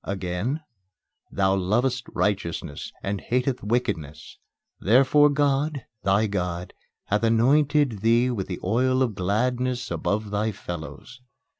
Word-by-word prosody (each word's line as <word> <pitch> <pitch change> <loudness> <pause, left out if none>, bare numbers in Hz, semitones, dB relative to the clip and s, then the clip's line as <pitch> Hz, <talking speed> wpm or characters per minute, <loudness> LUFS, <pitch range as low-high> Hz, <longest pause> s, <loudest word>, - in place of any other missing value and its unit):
Again: 100 - -3 0.7
"Thou 95 -1 +2
lovest 120 +7 0
righteousness, 85 -7 -2
and 100 0 -2
hatest 125 +1 -1
wickedness. 100 - -3 0.4
Therefore 135 +7 +5
God, 145 -1 0 0.2
thy 100 +3 +2
God, 90 -3 -3 0.3
hath 105 +1 0
anointed 135 +2 +3
thee 115 +4 +3
with 100 -6 -3
the 90 - -5
oil 130 +6 +2
of 120 -4 -1
gladness 120 +5 -1
above 105 0 -2
thy 105 +2 0
fellows." 85 - -8
110 Hz, 115 wpm, -25 LUFS, 95-130 Hz, 0.7 s, Therefore